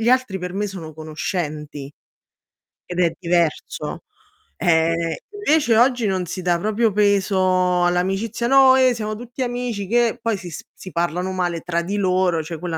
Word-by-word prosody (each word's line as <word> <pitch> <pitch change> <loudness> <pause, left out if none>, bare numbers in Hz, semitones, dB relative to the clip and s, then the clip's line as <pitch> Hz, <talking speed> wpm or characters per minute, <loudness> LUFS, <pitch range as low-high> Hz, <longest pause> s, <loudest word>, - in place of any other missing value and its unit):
gli 225 - +1
altri 255 -6 +2
per 180 0 -5
me 205 +1 -1
sono 165 -5 -8
conoscenti 150 -2 -5 0.9
ed 180 0 -3
è 170 -2 +3
diverso. 170 -3 -1 0.5
Eh, 165 -1 +1
invece 315 - +2
oggi 245 -1 +3
non 190 -2 0
si 185 +2 -5
dà 175 -1 +1
proprio 215 +4 +1
peso 185 -3 +2
all'amicizia: 195 +6 0
"No, 265 0 +7
eh, 260 -1 +4
siamo 215 -2 -4
tutti 245 +3 -8
amici, 245 -5 -3
che" 240 +2 +2
poi 230 -2 0
si 175 -4 -8 0.2
si 185 - -11
parlano 175 +2 -1
male 175 -3 -2
tra 170 0 -1
di 185 +4 -3
loro, 185 -4 +1
cioè 160 +1 -7
quella 170 -1 -3
185 Hz, 160 wpm, -21 LUFS, 170-225 Hz, 0.9 s, No